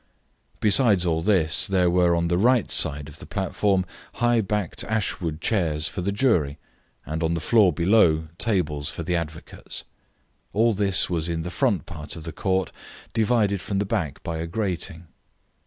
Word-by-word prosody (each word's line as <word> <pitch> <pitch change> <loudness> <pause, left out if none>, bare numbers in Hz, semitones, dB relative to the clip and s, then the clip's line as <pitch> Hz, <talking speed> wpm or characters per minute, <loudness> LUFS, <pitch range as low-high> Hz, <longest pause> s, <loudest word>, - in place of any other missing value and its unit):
Besides 105 -3 +4
all 80 -2 +1
this, 85 -3 +2
there 95 -2 +2
were 90 -1 +3
on 85 0 0
the 85 +1 +1
right 120 0 +3
side 75 -1 +1
of 80 +1 -12
the - - -11
platform 95 0 0 0.3
high 120 -1 +2
backed 105 -3 -2
ashwood 90 -7 -2
chairs 80 -7 0
for 90 - -4
the 100 +3 -1
jury, 90 - +1 0.5
and 80 +4 -4
on 80 0 +1
the - - -1
floor 100 +2 +4
below 85 -2 +3
tables 75 -10 0
for - - -5
the 90 - -1
advocates. 85 -1 -6 0.7
All 115 +2 +3
this 100 -2 +2
was 85 -2 -1
in 80 -1 -2
the 90 - -5
front 115 -4 0
part 75 -3 -7
of 80 - -8
the 80 - -7
court, 95 -3 -1 0.4
divided 110 -4 +1
from 100 - -3
the 100 - 0
back 75 -7 -3
by 80 -1 -4
a 80 - -3
grating. 90 -3 -3
90 Hz, 170 wpm, -24 LUFS, 80-105 Hz, 0.7 s, Besides